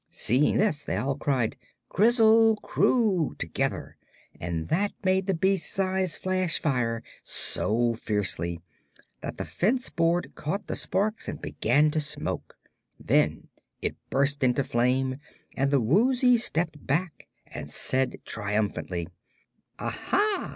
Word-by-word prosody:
Seeing 130 +6 +2
this, 190 -9 +1
they 95 - -2
all 135 +5 -1
cried 130 -6 -1 0.3
"Krizzle 225 +1 +5
Kroo!" 205 - +2
together, - - -3 0.4
and 85 -1 -3
that 200 +5 +1
made 190 0 +2
the 195 - +1
beast's 190 0 0
eyes 190 -3 0
flash 185 -2 0
fire 120 -6 -1 0.2
so 115 +2 +1
fiercely 95 -7 -2 0.6
that - - -6
the - - -4
fence 245 +7 0
board 170 +1 0
caught 190 +7 -4
the - - -3
sparks 215 +3 -1
and - - -5
began 145 +7 +2
to 155 - 0
smoke. 150 0 -3 0.4
Then - - +1 0.3
it - - -2
burst 140 +1 +1
into 130 +2 +2
flame, 130 +2 +1 0.4
and 135 +1 +1
the 140 -1 +3
Woozy 245 - +4
stepped 165 -9 -1
back 160 +4 -2 0.2
and - - -8
said 130 0 +1
triumphantly: 105 -5 -2 0.7
"Aha! 415 -1 -1
150 Hz, 125 wpm, -27 LUFS, 125-195 Hz, 0.7 s, Krizzle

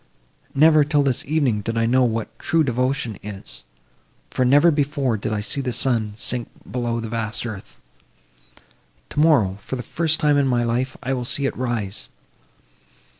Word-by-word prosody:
Never, 155 +1 +6
till 145 0 +2
this 135 -3 0
evening, 135 -8 +1
did 115 +2 -3
I 115 - +2
know 130 +3 +3
what 115 -2 -2
true 165 -1 +2
devotion 125 -3 -1
is; 95 -12 -7 0.7
for, 130 - +1
never 145 +7 +5
before 145 -4 0
did 110 +1 -3
I 105 -1 -1
see 125 +6 -1
the 130 -2 -2
sun 115 -4 0
sink 120 +2 -2 0.2
below 120 -1 -1
the 115 - -4
vast 110 -1 -2
earth! 95 - -8 1.3
Tomorrow, 135 -11 +3
for 130 - -5
the 125 - -5
first 160 +3 0
time 150 -2 +3
in 140 -1 +3
my 120 -2 +2
life, 125 +3 -1
I 135 +1 -1
will 125 -2 -2
see 140 +3 0
it - - -1
rise. 120 -6 -3
125 Hz, 170 wpm, -22 LUFS, 115-140 Hz, 1.3 s, Never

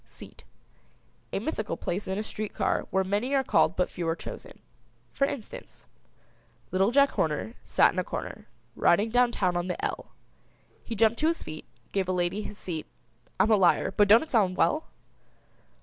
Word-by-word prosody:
SEAT. - - -13 0.9
A - - -1
mythical 215 - -3
place 190 +4 -3
in 190 +1 -2
a 210 - -2
street 215 -1 -6
car - - 0
where 190 - +1
many 205 +8 -1
are 270 - +3
called 175 -8 +3
but 180 - +1
few 170 -2 -5
are 165 - +1
chosen. - - -9 0.6
For 275 - +2
instance: 280 - -8 0.9
Little 190 +2 +3
Jack 280 +3 +4
Horner 155 +8 -1
Sat - - +3
in - - -2
a - - 0
corner - - -6 0.3
Riding 205 +6 +3
down 245 0 +4
town 185 -6 0
on 175 +1 -1
the 180 - -3
"L." - - -4 0.8
He 230 - -5
jumped 225 +2 +3
to 310 - +2
his 335 0 -1
feet 155 0 -8 0.3
Gave 195 -2 0
a - - +1
lady 180 +3 0
his 210 -1 -8
seat 165 -6 -5 0.5
I'm 220 - +4
a - - +7
liar, 185 -4 +3
but 205 -1 +4
don't 220 +6 +7
it 320 - -12
sound 195 -6 +2
well. 310 +1 +2
205 Hz, 185 wpm, -27 LUFS, 180-235 Hz, 0.9 s, a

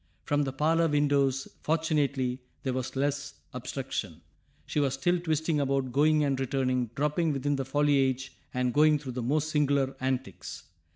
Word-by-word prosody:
From 145 0 +1
the 135 - -2
parlor 160 +5 +2
windows, 140 -3 +2
fortunately, 145 -5 0 0.2
there 130 - -1
was 130 +1 -3
less 140 +1 -1 0.2
obstruction, 125 - -4 0.4
she - - -1
was 135 -2 +1
still 175 +6 +1
twisting 160 -2 0
about, 135 -2 0
going 150 +3 +4
and 135 -2 0
returning, 130 -2 0
dropping 150 +3 +1
within 145 +1 0
the 135 -1 -2
foliage 135 -2 +1 0.2
and 125 -1 0
going 150 0 +5
through 140 -3 -6
the 125 0 -4
most 150 +6 0
singular 140 -3 +2
antics. 130 -6 -3
140 Hz, 155 wpm, -29 LUFS, 130-150 Hz, 0.4 s, going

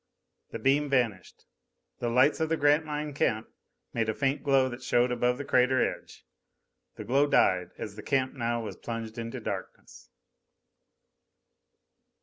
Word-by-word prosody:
_ - - -39
The - - -4
beam 145 +2 +2
vanished. 120 -9 -1 0.5
The 120 - -1
lights 130 +7 +3
of 160 -1 0
the 165 - +1
Grantline 150 0 +1
camp 110 -5 0 0.4
made 115 -1 0
a 110 - -1
faint 135 0 0
glow 135 -2 +3
that 125 0 -7
showed 125 0 +2
above 125 0 +1
the 145 - -6
crater 130 -1 +3
edge. - - -3 0.7
The - - -7
glow 135 +6 +2
died, 90 -10 +3
as 105 -2 -6
the 105 - -8
camp 130 +2 0
now 120 -3 -2
was 110 - -6
plunged 115 -1 -6
into 115 0 -5
darkness. - - -7
125 Hz, 150 wpm, -28 LUFS, 115-140 Hz, 0.7 s, lights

